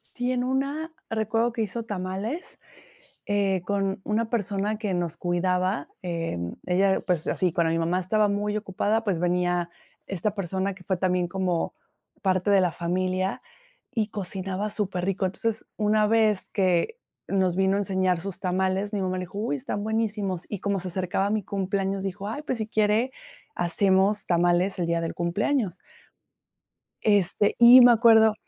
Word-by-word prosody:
Sí, 245 0 -1
en 250 -1 0
una 280 +5 -2 0.2
recuerdo 225 +2 0
que 230 -2 -1
hizo 230 +3 -4
tamales, 205 - -4 0.7
eh, 200 -2 +1
con 195 -1 -1
una 220 +1 -1
persona 205 -1 -1
que 210 -4 -2
nos 175 -2 -2
cuidaba. 180 -2 0
Em, 165 - -3
ella, 190 +2 +2
pues, 175 -4 -1
así, 180 -2 0
cuando 165 -1 +1
mi 165 - +1
mamá 170 +2 +1
estaba 210 +4 +2
muy 205 +1 -1
ocupada, 215 +2 -1
pues 195 -6 0
venía 175 0 +1 0.4
esta 195 +2 -2
persona 195 0 -2
que 185 - -15
fue 190 +1 -1
también 180 -1 0
como 180 -2 -1 0.5
parte 185 +1 +1
de 195 -2 +5
la 180 -2 +1
familia, 185 +2 -1 0.5
y 215 -2 0
cocinaba 195 0 -4
superrico. 190 -2 -1
Entonces, 225 +4 -2
una 215 0 +2
vez 215 -3 +2
que 185 - +1 0.3
nos 190 -3 +1
vino 190 +1 +2
a - - +1
enseñar 190 -3 +1
sus 190 +2 -6
tamales, 190 +2 0
mi 200 - -1
mamá 185 0 -1
le 185 - -3
dijo: 185 +3 -9
"Uy, 175 -10 -1
están 170 +10 -4
buenísimos". 210 -5 -2
Y 205 - -5
como 200 -1 -1
se 185 - -5
acercaba 185 +2 -1
a - - -1
mi 215 0 0
cumpleaños, 195 0 -2
dijo: 195 +1 -4
"Ay, 225 +7 -4
pues, 260 -5 -3
si 220 - -2
quiere, 215 +3 +1 0.4
hacemos 190 +3 +2
tamales 175 +2 +2
el 175 - 0
día 170 0 0
del 165 - -2
cumpleaños". 190 +3 0 1.3
Este, 205 -1 +2
y 240 +2 +10
me 245 0 +9
acuerdo 225 -2 +6
195 Hz, 165 wpm, -26 LUFS, 180-215 Hz, 1.3 s, y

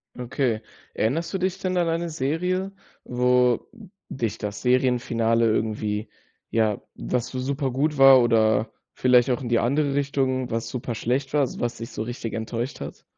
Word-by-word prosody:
Okay. 125 -2 -1 0.3
Erinnerst 160 - -1
du 190 - -1
dich 185 0 -1
denn 185 -1 -2
an 175 -2 +2
eine 165 +1 -1
Serie, 180 +7 -1 0.3
wo 125 -1 +2 0.4
dich 115 -6 -3
das 105 -1 -5
Serienfinale 120 -2 +2
irgendwie, 110 -1 -1 0.4
ja 110 -3 +1
was 115 - -2
so 130 - -5
super 135 +1 -1
gut 145 +4 0
war 135 -1 +9
oder 110 -1 +2 0.2
vielleicht 125 0 +4
auch 125 - -1
in 125 - -4
die 120 - +3
andere 140 +3 +1
Richtung, 135 -3 0
was 115 0 -2
super 125 -1 -4
schlecht 130 +5 -2
war, 150 - +3
also 135 - -2
was 120 0 -2
dich 115 - -7
so - - -4
richtig 115 -1 -5
enttäuscht 115 +3 -4
hat? - - -8
125 Hz, 170 wpm, -24 LUFS, 115-140 Hz, 0.4 s, war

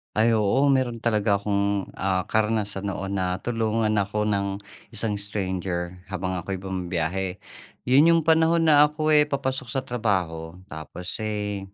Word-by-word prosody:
Ay, 110 +2 +4
oo. 110 +5 +2
Meron 120 -3 0
talaga 105 -3 +2
akong, 100 -1 -1
ah, 95 0 -1
karanasan 105 -2 -1
noon, 95 0 -3
natulungan 110 +4 0
ako 105 +1 -1
ng 100 -2 0 0.4
isang 105 -1 -1
stranger 95 -3 -3
habang 95 -1 -3
ako'y 95 +3 -4
bumabiyahe. 90 0 -3 0.5
'Yun 145 +7 +5
'yung 165 - +3
panahon 165 +1 +4
na 150 -2 +6
ako, 155 +1 -1
eh, 150 -1 +5
papasok 135 -3 -2
sa 130 +3 -2
trabaho 90 -10 -2 0.2
tapos, 80 +5 -7
eh, 105 -2 -3
100 Hz, 140 wpm, -25 LUFS, 95-120 Hz, 0.5 s, na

